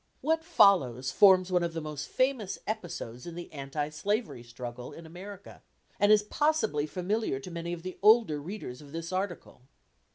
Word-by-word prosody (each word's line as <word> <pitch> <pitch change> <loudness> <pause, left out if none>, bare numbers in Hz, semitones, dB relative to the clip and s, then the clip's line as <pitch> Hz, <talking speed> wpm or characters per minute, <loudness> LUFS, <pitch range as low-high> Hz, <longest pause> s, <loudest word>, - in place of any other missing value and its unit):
What 320 +2 +1
follows 135 - +4
forms 185 +3 +6
one 180 -1 +3
of 170 -1 -2
the 165 - -3
most 150 -2 -5
famous 255 -7 0
episodes 175 - -5
in 170 - -7
the 175 -1 -8
anti 145 +1 -3
slavery 170 - -2
struggle 120 +1 -8
in 165 - -11
America, 190 +4 -10 0.4
and 205 0 +5
is 210 -1 +6
possibly 220 - +1
familiar 185 -2 -1
to 175 - -9
many 170 0 -4
of 170 -1 -5
the 185 0 -7
older 210 -8 +5
readers 150 -7 -7
of 145 0 -14
this 165 +1 -5
article. 185 -8 -4
175 Hz, 170 wpm, -29 LUFS, 150-205 Hz, 0.4 s, forms